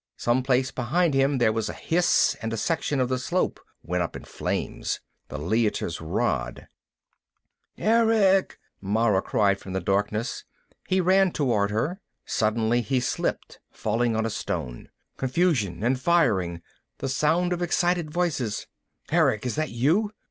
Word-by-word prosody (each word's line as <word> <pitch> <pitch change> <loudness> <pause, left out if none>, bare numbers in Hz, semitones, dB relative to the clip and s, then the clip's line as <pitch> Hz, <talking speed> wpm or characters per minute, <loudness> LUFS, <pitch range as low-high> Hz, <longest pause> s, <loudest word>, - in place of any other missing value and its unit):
Someplace 130 +2 +1
behind 155 +6 +1
him 135 +1 +2
there 115 -3 +3
was 115 -1 -2
a - - -4
hiss, 175 +1 +2
and 110 0 -3
a 115 - -2
section 145 +1 -1
of 130 - +2
the 130 0 -1
slope 175 +8 -1 0.2
went 90 +1 -1
up 85 - -3
in - - -7
flames. - - -3 0.3
The - - -6
Leiter's 95 0 -1
rod - - -2 1.1
"Erick," 220 -4 +3 0.2
Mara 105 0 +2
cried 100 -2 +1
from 95 - -8
the 95 - 0
darkness. 105 +4 -1 0.4
He 185 - +2
ran 190 +1 +4
toward 115 -10 +1
her. 145 - -2 0.2
Suddenly 115 +2 +1
he 125 +3 0
slipped, 125 - -3
falling 115 +1 -1
on 110 0 0
a 115 - -2
stone. 60 -10 -4 0.3
Confusion 130 - 0
and 125 +2 +1
firing. 95 - +1 0.3
The - - -4
sound 160 +7 +1
of 175 - -4
excited 175 -1 +1
voices. 150 -10 -1 0.5
"Erick, 110 +3 +2
is 125 - -1
that 155 0 -1
you?" 160 - +1
125 Hz, 145 wpm, -25 LUFS, 105-170 Hz, 1.1 s, ran